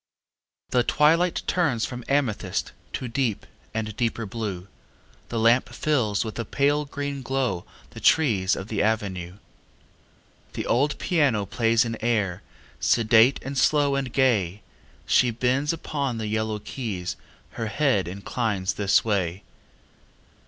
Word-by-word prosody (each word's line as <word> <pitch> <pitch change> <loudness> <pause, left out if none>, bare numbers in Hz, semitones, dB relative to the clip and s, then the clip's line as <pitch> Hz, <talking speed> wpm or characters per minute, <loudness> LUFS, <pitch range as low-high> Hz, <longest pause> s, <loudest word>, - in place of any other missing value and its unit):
II - - -66
The - - +4
twilight 165 +7 +3
turns 145 -11 +1
from 125 -1 -6
amethyst 135 -6 0 0.2
To 130 - -3
deep 115 -3 -1 0.3
and 110 -2 -3
deeper 115 -1 -1
blue, 100 -4 -5 0.6
The 120 - -3
lamp 115 +3 +4
fills 120 -9 0
with 110 +1 -6
a - - 0
pale 145 +5 +1
green 140 -1 -4
glow 125 -9 -1 0.3
The - - -9
trees 105 -12 +3
of 95 - -6
the 110 -2 -1
avenue. 100 -5 -1 1.2
The - - -4
old 145 +5 +1
piano 140 - +1
plays 115 +2 +2
an 115 -1 -3
air, 105 -6 0 0.4
Sedate 115 +2 +4
and 135 +1 -5
slow 145 +1 +3
and 135 -3 -1
gay; 105 -8 +1 0.4
She 125 - +4
bends 130 +5 +1
upon 140 -6 -3
the 110 - -3
yellow 110 0 -1
keys, 100 -6 -5 0.4
Her 115 -1 -4
head 125 -6 +1
inclines 100 +1 -2
this 100 +1 +2
way. 95 -4 -1
115 Hz, 135 wpm, -25 LUFS, 105-135 Hz, 1.2 s, The